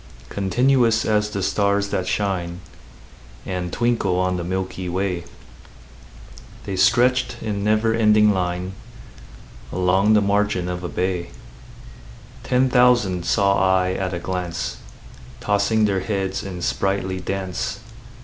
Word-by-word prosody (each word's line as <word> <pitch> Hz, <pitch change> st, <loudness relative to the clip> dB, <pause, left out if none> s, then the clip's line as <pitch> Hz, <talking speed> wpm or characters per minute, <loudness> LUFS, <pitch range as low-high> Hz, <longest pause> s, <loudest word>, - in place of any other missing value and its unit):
Continuous 120 Hz, +3 st, +2 dB
as 105 Hz, -1 st, +1 dB
the 100 Hz, -2 st, -3 dB
stars 100 Hz, +1 st, +1 dB
that 95 Hz, -2 st, -2 dB
shine 90 Hz, -3 st, -2 dB, 0.8 s
And 90 Hz, -1 st, -4 dB
twinkle 115 Hz, -6 st, 0 dB
on 90 Hz, 0 st, +1 dB
the 85 Hz, -, -3 dB
milky 95 Hz, 0 st, -3 dB
way, 90 Hz, -1 st, -2 dB, 1.4 s
The 100 Hz, -, -3 dB
stretched 120 Hz, +7 st, +3 dB
in 105 Hz, -2 st, -3 dB
never 110 Hz, +2 st, +2 dB
ending 105 Hz, -2 st, +4 dB
line 90 Hz, 0 st, -2 dB, 1.0 s
Along 95 Hz, +4 st, +2 dB
the 105 Hz, -, +5 dB
margin 100 Hz, -2 st, +1 dB
of 90 Hz, 0 st, -4 dB
a 90 Hz, -, -3 dB
bay: 90 Hz, -2 st, -2 dB, 1.1 s
Ten 130 Hz, +1 st, +2 dB
thousand 120 Hz, -8 st, +3 dB
saw 100 Hz, -1 st, +3 dB
I 95 Hz, -1 st, +2 dB
at 95 Hz, 0 st, -2 dB
a 90 Hz, -, -3 dB
glance, 85 Hz, -8 st, -4 dB, 0.6 s
Tossing 105 Hz, +2 st, +2 dB
their 100 Hz, -2 st, +1 dB
heads 95 Hz, -1 st, -2 dB
in 90 Hz, -3 st, -7 dB
sprightly 95 Hz, -1 st, -1 dB
dance. 95 Hz, +5 st, -4 dB
95 Hz, 120 wpm, -22 LUFS, 90-105 Hz, 1.4 s, the